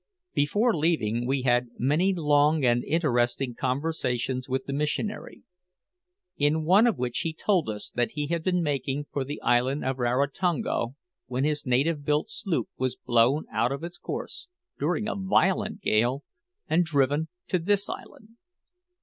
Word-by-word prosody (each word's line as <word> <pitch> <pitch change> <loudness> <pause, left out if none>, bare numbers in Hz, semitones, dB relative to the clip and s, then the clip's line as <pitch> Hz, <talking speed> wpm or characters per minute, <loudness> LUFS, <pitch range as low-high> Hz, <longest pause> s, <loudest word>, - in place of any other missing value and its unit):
Before 210 +11 +2
leaving 120 -8 0
we 135 0 0
had 125 -1 +2
many 150 +10 +2
long 150 -3 +3
and 120 0 +3
interesting 135 -5 0
conversations 130 -2 -2
with 130 0 -1
the 140 - -4
missionary, 150 +9 -3 0.9
in 150 +2 +2
one 200 +8 +6
of 230 - +1
which 120 +1 -1
he 160 0 -2
told 180 - +1
us 105 -1 -5
that 120 -1 -1
he 150 -1 -2
had 165 +2 -1
been 180 -1 +1
making 140 -1 -1
for 140 - -1
the 145 +3 -6
island 125 +4 +2
of 130 0 -1
Rarotonga 140 +4 0 0.4
when 130 +1 -1
his 150 -2 -1
native 145 +5 +1
built 150 +9 0
sloop 195 -8 -2
was 130 -1 0
blown 120 +6 +2
out 120 - +1
of 140 +3 -4
its 175 0 -7
course, - - -6 0.3
during 175 +8 0
a - - -1
violent 190 -1 +1
gale, 120 +6 +1 0.4
and 170 +3 +3
driven 145 -1 +1 0.2
to 185 - +1
this 200 +3 +1
island. 220 - -9
145 Hz, 155 wpm, -27 LUFS, 125-165 Hz, 0.9 s, one